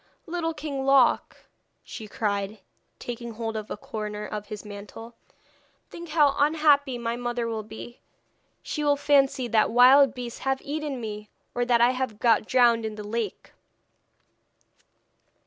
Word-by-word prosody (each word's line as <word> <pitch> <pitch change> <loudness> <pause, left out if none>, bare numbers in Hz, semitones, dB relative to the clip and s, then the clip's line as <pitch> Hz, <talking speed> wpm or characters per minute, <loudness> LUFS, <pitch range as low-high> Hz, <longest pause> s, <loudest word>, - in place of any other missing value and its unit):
'Little 330 -2 -3
King 290 -3 -4
Loc,' 270 -2 +3 0.5
she 220 - -9
cried, 205 0 -2 0.4
taking 235 -1 -6
hold 225 0 -4
of 215 -1 -5
a - - -5
corner 210 0 -5
of 210 -1 -6
his 210 0 -8
mantle, 210 +3 -10 0.8
'think 340 -1 -9
how 295 -3 +3
unhappy 290 -3 +3
my 235 0 -2
mother 240 -1 -3
will 225 -1 -3
be. 220 +3 -10 0.6
She 300 - -3
will 290 -1 +3
fancy 280 -2 +2
that 220 -1 +3
wild 260 +4 +6
beasts 245 -2 -6
have 270 0 -1
eaten 295 -2 -4
me, 210 -2 -7 0.2
or 245 0 0
that 240 -1 +3
I 240 +1 +5
have 255 -4 -3
got 225 -2 +3
drowned 240 -3 +4
in 220 -1 -4
the 210 - -7
lake.' 225 -2 -4
240 Hz, 145 wpm, -26 LUFS, 220-275 Hz, 0.8 s, wild